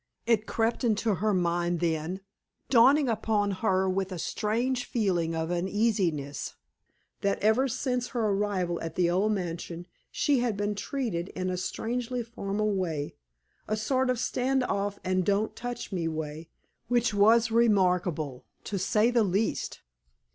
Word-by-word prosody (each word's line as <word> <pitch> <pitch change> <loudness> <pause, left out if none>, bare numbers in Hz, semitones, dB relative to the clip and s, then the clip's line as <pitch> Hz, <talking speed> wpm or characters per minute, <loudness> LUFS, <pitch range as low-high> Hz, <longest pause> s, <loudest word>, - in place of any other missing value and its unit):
It 225 -2 +2
crept 225 +3 0
into 220 -1 +2
her 210 +4 0
mind 175 -2 +1
then 165 +2 -1 0.5
dawning 270 +4 +6
upon 215 -2 +1
her 190 -1 +1
with 190 0 -1
a 185 - -4
strange 240 +8 -1
feeling 175 -8 0
of 160 +1 -2
uneasiness 175 -6 0 0.7
that 200 0 +1
ever 220 +6 +3
since 250 0 -1
her 230 -4 -1
arrival 195 -4 0
at 165 -1 -5
the 175 -1 +2
old 195 +4 +2
mansion 175 -3 -4 0.2
she 285 -3 +2
had 240 -4 0
been 205 +1 0
treated 205 -6 -3
in 185 0 -1
a - - -1
strangely 240 +6 -3
formal 215 -2 -2
way, 165 -6 -2 0.5
a 215 - 0
sort 260 +4 +1
of 250 - +1
stand 255 +2 0
off 200 -3 -1
and 185 0 +1
don't 205 +3 0
touch 245 -2 -5
me 175 -4 -1
way, 160 0 -5 0.4
which 240 -1 +2
was 225 +3 +5
remarkable, 180 - +2 0.2
to 200 - -3
say 215 +5 +2
the 235 -2 +3
least. 200 +3 -1
205 Hz, 145 wpm, -28 LUFS, 180-230 Hz, 0.7 s, dawning